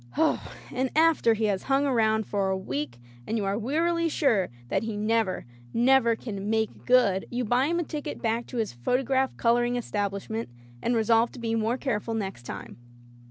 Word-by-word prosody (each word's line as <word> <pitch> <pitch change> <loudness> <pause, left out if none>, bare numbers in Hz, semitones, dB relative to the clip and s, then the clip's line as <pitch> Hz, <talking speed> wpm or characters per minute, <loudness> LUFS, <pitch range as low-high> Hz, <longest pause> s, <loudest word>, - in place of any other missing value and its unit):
And 260 +1 0
after 315 -8 +4
he 220 0 0
has 200 -3 0
hung 275 +1 +3
around 220 -5 +2
for 200 -2 0
a 190 - 0
week 140 -8 -4 0.3
and 225 - 0
you 205 - -1
are 195 +1 0
wearily 330 +9 +1
sure 235 - +2 0.2
that - - +1
he 225 -2 -4
never, 215 -2 0 0.3
never 240 -1 +4
can 205 -3 -5
"make 220 0 -1
good," 240 -7 +4
you 245 0 -2
buy 245 +5 +2
him 340 +2 0
a 345 - +1
ticket 300 -2 -5
back 230 0 -1
to 250 - -6
his 220 - -1
photograph 260 - 0
coloring 240 +1 +2
establishment 205 - -3 0.3
and 240 - +1
resolve 225 +1 +3
to - - -10
be 230 -1 -2
more 225 +2 +1
careful 230 -4 -2
next 190 - -4
time. - - -7
230 Hz, 180 wpm, -27 LUFS, 210-255 Hz, 0.3 s, after